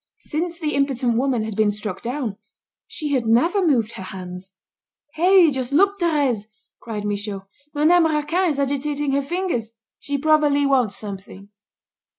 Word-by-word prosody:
Since 335 +2 -3
the 305 -3 -2
impotent 265 -4 +1
woman 250 -2 +1
had 220 -2 -5
been 215 0 +3
struck 210 -2 -4
down, 240 -4 -3 0.5
she 300 - -4
had 245 -4 0
never 335 - +3
moved 240 -10 +2
her - - -9
hands. 185 0 -8 0.6
"Hey! 360 -1 +5
Just 260 -1 -3
look, 400 +7 +3
Thérèse," 285 - +1 0.3
cried 215 -3 -5
Michaud. 205 -1 -3 0.3
"Madame 325 +3 +4
Raquin 320 +4 0
is 290 - -1
agitating 285 +1 -1
her 280 +1 +1
fingers. 280 - -3 0.3
She 285 0 -3
probably 295 -1 +3
wants 255 -7 +2
something." 200 -1 -9
275 Hz, 150 wpm, -22 LUFS, 215-305 Hz, 0.6 s, Hey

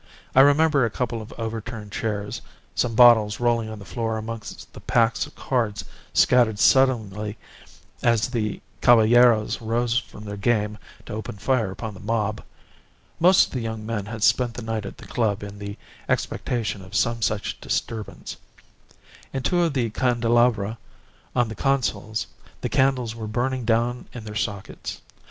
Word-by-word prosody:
I - - +5
remember 145 0 +5
a 115 - +2
couple 115 0 -3
of 110 - -10
overturned 110 -1 -5
chairs, 105 -2 -3 0.3
some 115 -2 0
bottles 115 -3 +6
rolling 120 -2 +1
on 110 - -7
the 100 - -11
floor 115 -1 -2
amongst 110 0 -7
the - - -10
packs 115 -1 +1
of - - -18
cards 110 -6 -1 0.3
scattered 120 -4 +4
suddenly 110 -5 +2 0.6
as 115 -1 +2
the 110 -5 -2 0.2
caballeros 120 -1 +5
rose 120 +2 +1
from 105 - -12
their 100 0 -6
game 105 0 0 0.3
to - - -7
open 110 -1 -5
fire 110 0 +1
upon 110 +3 -6
the 95 - -12
mob. 105 0 -1 0.8
Most 180 +3 +6
of - - -15
the 130 - -2
young 110 -1 -4
men 105 -3 -3
had 110 -1 -5
spent 120 -1 +3
the 125 - -6
night 110 -2 -3
at - - -9
the - - -12
club 105 -4 -1
in 100 0 -8
the 100 0 -6 0.3
expectation 110 -5 -1
of 95 0 -10
some 115 0 +1
such 105 -2 -1
disturbance. 110 -2 -4 0.9
In 135 - -3
two 175 -1 +2
of 165 -3 +1
the 120 -5 0
candelabra, 120 -3 +2 0.6
on 120 -1 +3
the 110 - -6
consoles, 110 -5 -1 0.4
the - - -2
candles 130 -4 +1
were 115 -1 -6
burning 125 +3 -1
down 120 +2 0
in 120 - -7
their 105 -1 -7
sockets. 100 -1 -4
115 Hz, 160 wpm, -24 LUFS, 105-120 Hz, 0.9 s, bottles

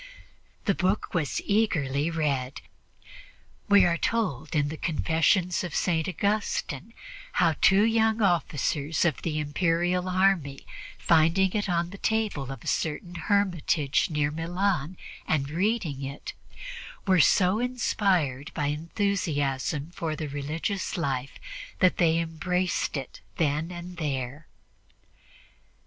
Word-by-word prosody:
The 200 - +3
book 190 +3 -1
was 160 -5 0
eagerly 155 -9 +1
read; 140 -5 -1 1.1
we 200 -2 +7
are 170 -1 +1
told 165 - -1
in 145 -1 +2
the 155 - -5
Confessions 170 +3 +1
of 175 - -5
St. 165 -2 +1
Augustine 200 - -2 0.4
how 170 -2 +3
two 195 +2 +6
young 225 0 +2
officers 160 -5 +1
of 165 -5 0
the 155 -2 -2
Imperial 175 +4 0
army, 185 -7 +1 0.3
finding 170 +4 +3
it 205 -2 -1
on 170 0 0
the 200 - -10
table 210 - -1
of 135 -4 -8
a - - -10
certain 160 +3 -2
hermitage 175 -6 +1
near 150 -2 0
Milan 175 0 -1 0.3
and 140 -3 0
reading 175 - -1
it, 140 +1 -6 0.7
were 185 -2 +4
so 185 +7 +4
inspired 190 - 0
by 150 - -1
enthusiasm 150 -4 -1
for 165 -3 -3
the 155 - -4
religious 155 +9 -3
life 135 -5 -2 0.4
that 185 - +3
they 165 -2 +3
embraced 170 +1 -1
it 135 -2 -7 0.2
then 155 +1 0
and 175 0 -8
there. 140 -1 -3
165 Hz, 120 wpm, -27 LUFS, 145-190 Hz, 1.1 s, we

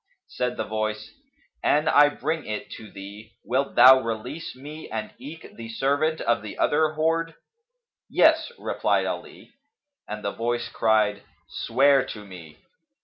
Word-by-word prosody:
Said 125 0 -2
the - - -1
Voice, 110 0 -3 0.5
"An 150 +2 +2
I 145 -2 +6
bring 155 +2 -3
it 105 -1 -5
to 110 - -9
thee, 100 +3 -11
wilt 135 +2 -1
thou 130 +1 +9
release 125 +8 -5
me 150 +4 -10
and 110 -1 -5
eke 150 +6 -10
the 115 -1 -8
servant 145 +6 0
of 120 - +1
the 105 - -8
other 155 +1 +2
hoard?" 165 +1 0 0.7
"Yes," - - +4
replied - - 0
Ali, - - -7 0.6
and 105 0 -6
the 100 - -1
Voice 120 +1 -2
cried, 105 -2 +2 0.3
"Swear 135 +3 +3
to 105 -5 -8
me." 85 -6 -12
125 Hz, 145 wpm, -25 LUFS, 110-145 Hz, 0.7 s, thou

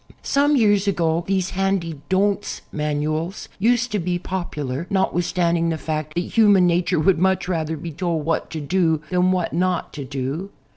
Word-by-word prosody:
Some 290 +1 +3
years 205 -5 +3
ago 170 -3 +1
these 190 -1 0
handy 185 -6 -1
"Don't" 200 +2 0
manuals 155 +4 -2
used 240 +3 +2
to 210 - 0
be 175 0 -1
popular, 170 -5 -4
notwithstanding 175 -3 +1
the 160 - -1
fact 155 -1 -4
that 175 - +1
human 205 -1 +4
nature 175 0 +2
would 165 +2 +3
much 190 0 +1
rather 160 -3 -1
be 165 +3 -6
told 165 -1 -2
what 165 - -1
to 160 - -5
do 160 0 +1
than 180 0 +3
what 180 -2 -1
not 180 +1 0
to 145 - -5
do. 140 +7 -4
175 Hz, 165 wpm, -22 LUFS, 160-190 Hz, -, human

